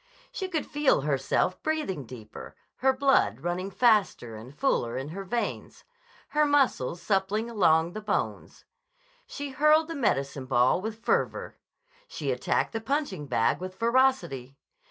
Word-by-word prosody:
She 380 - -4
could 315 -5 -2
feel 295 - +2
herself 150 +6 0
breathing 300 - -2
deeper, 110 -4 -10 0.2
her 265 +1 +3
blood 265 - +2
running 175 +3 -2
faster 205 - +2
and 120 +6 -11
fuller 120 - 0
in 135 +3 -4
her 195 +5 -6
veins, 235 +5 -4 0.5
her 300 0 +2
muscles 275 - +2
suppling 205 +4 0
along 170 -5 +3
the 215 - -5
bones. 210 - -3 0.6
She 285 -1 -6
hurled 305 +3 +4
the - - -3
medicine 140 - -1
ball 125 +6 +3
with 220 +2 -6
fervor. - - -1 0.5
She - - -3
attacked - - 0
the 225 - -3
punch 285 +1 -1
ing 150 -6 -7
bag 120 -3 +1
with 185 +1 -6
ferocity. 230 - +1
195 Hz, 145 wpm, -27 LUFS, -, 0.6 s, hurled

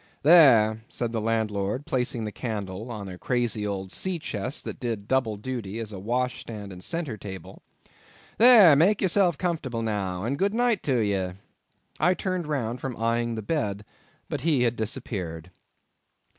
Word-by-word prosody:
"There," 115 -9 +6
said 120 -2 -3
the 115 -2 -2
landlord, 110 +2 -1
placing 125 -6 -1
the 105 - -4
candle 105 -1 -5
on 105 -4 -6
a 90 -1 -8
crazy 120 -4 -1
old 95 -2 -4
sea 185 - -1
chest 130 -4 -4
that - - -6
did 115 -5 -4
double 120 -5 +1
duty 110 -2 -5
as 115 -2 -5
a 95 - -6
wash 125 +5 -1
stand 105 -4 -8
and 90 0 -9
centre 165 -10 -3
table; 95 -3 -9 0.8
"there, 220 - +9
make 190 +8 +4
yourself 185 -3 +3
comfortable 145 -10 -2
now, 100 -4 -2
and 135 +6 -2
good 200 +2 +1
night 240 -4 +2
to 130 -5 +2
ye." 95 -3 -1 0.7
I 180 +5 +3
turned 185 -4 -2
round 125 -5 -2
from 130 -4 -4
eyeing 115 +1 0
the 110 - -5
bed, 105 -7 -2 0.4
but - - -4
he 150 -6 +2
had 120 -1 +1
disappeared. 100 - -4
115 Hz, 165 wpm, -26 LUFS, 105-145 Hz, 0.8 s, there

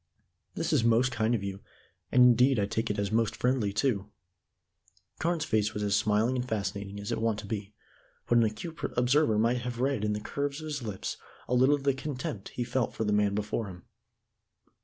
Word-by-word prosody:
"This - - -1
is - - +3
most 115 +2 +3
kind 115 0 +1
of 105 - -3
you, 100 0 -4 0.5
and 125 - +6
indeed 125 +2 +5
I 100 - +2
take 110 +3 -2
it 105 - -1
as 100 0 -1
most 115 0 +1
friendly 125 -5 +1
too." 105 -2 0 1.1
Carne's 165 -1 0
face 110 -1 0
was 105 - -2
as 100 0 +2
smiling 105 +4 +2
and 125 0 -3
fascinating 100 -1 -3
as 100 - -5
it - - -1
was - - -3
wont 110 -2 +1
to - - -10
be, 105 0 -5 0.5
but 120 - +4
an - - +5
acute 150 +10 -4 0.2
observer 125 -1 +3
might 120 +3 +2
have 120 -1 -5
read 135 -4 0
in 105 0 +1
the 105 - -2
curves 140 +6 -3
of 155 - -7
his 150 -3 -3
lips 105 -5 -4 0.3
a - - -2
little 130 +4 +5
of 140 - -7
the 140 -1 +3
contempt 130 -7 -5
he 125 - -3
felt 120 0 -1
for - - -1
the 105 -1 +1
man 105 -1 +2
before 105 +1 -2
him. 90 -2 -10
115 Hz, 215 wpm, -29 LUFS, 105-125 Hz, 1.1 s, and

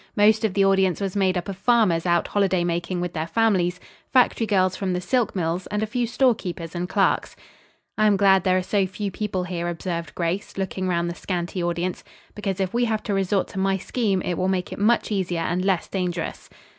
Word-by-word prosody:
Most 215 +1 +4
of 210 -4 0
the 195 -1 +4
audience 190 -2 +3
was 195 -1 -3
made 190 -2 +2
up 175 - -4
of 195 - -4
farmers 190 -5 +2
out 175 -1 +2
holiday 190 -3 +2
making 175 +1 -2
with 175 -1 -3
their 160 0 -3
families, 180 -2 +1 0.3
factory 245 -3 +3
girls 185 -3 +2
from 190 -2 -2
the 180 - 0
silk 215 +6 0
mills 175 0 -1
and 210 +1 -2
a - - +2
few 235 +2 -1
storekeepers 195 -10 0
and 180 +1 -3
clerks. - - +1 0.6
"I 215 - +5
am 205 -2 +4
glad 190 -2 +5
there 185 -1 +3
are 185 - 0
so 195 0 +1
few 200 +2 -4
people 195 -2 -2
here," 175 -1 -3
observed 170 -1 -4
Grace, 175 +4 -3
looking 190 -1 -2
around 170 -1 0
the - - -3
scanty 175 0 -3
audience; 175 +1 -2 0.3
"because, 195 -3 -3
if 190 -1 -1
we 240 +1 +2
have 220 -2 -1
to 205 - -2
resort 195 0 +1
to 195 - -5
my 195 0 +1
scheme, 195 -2 -1
it 175 - -2
will 185 - +1
make 185 -1 -1
it - - -8
much 225 +2 +2
easier 180 -4 -1
and 175 +2 -1
less 190 -3 +1
dangerous." 180 -3 -3
190 Hz, 220 wpm, -24 LUFS, 175-205 Hz, 0.6 s, I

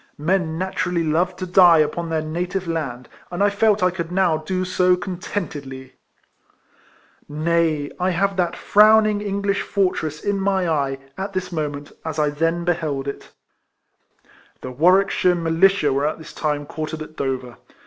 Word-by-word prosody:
Men 160 +1 0
naturally 180 -1 -1
love 170 +4 0
to 185 - -5
die 180 -2 +6
upon 165 +2 0
their 160 -1 -1
native 180 +4 -3
land, 140 -7 -4 0.2
and 175 +3 -1
I 205 - +3
felt 205 -1 +2
I 180 - +3
could 170 -2 -5
now 180 -3 +2
do 185 +4 -3
so 185 0 +3
contentedly! 150 -8 -6 1.4
Nay, 155 -1 0
I 180 +1 +1
have 195 +2 0
that 175 -2 0
frowning 215 0 +4
English 200 0 -1
fortress 170 -6 -1
in 200 -1 -1
ni}'' 190 -2 +1
eye, 140 -4 0 0.2
at 195 +1 -4
this 185 -1 -3
moment, 145 -3 -4
as 160 -1 -5
I 150 -1 +1
then 165 +3 -1
beheld 155 -6 -1
it. 140 - -6 1.3
The 130 - -6
AVarwickshire 180 +4 +3
Militia 165 -2 +2
were 140 +2 +1
at 155 - -3
this 160 0 -12
time 150 -1 -2
quartered 155 +1 -5
at 155 - -14
Dover. 130 -4 -4
170 Hz, 155 wpm, -21 LUFS, 155-185 Hz, 1.4 s, die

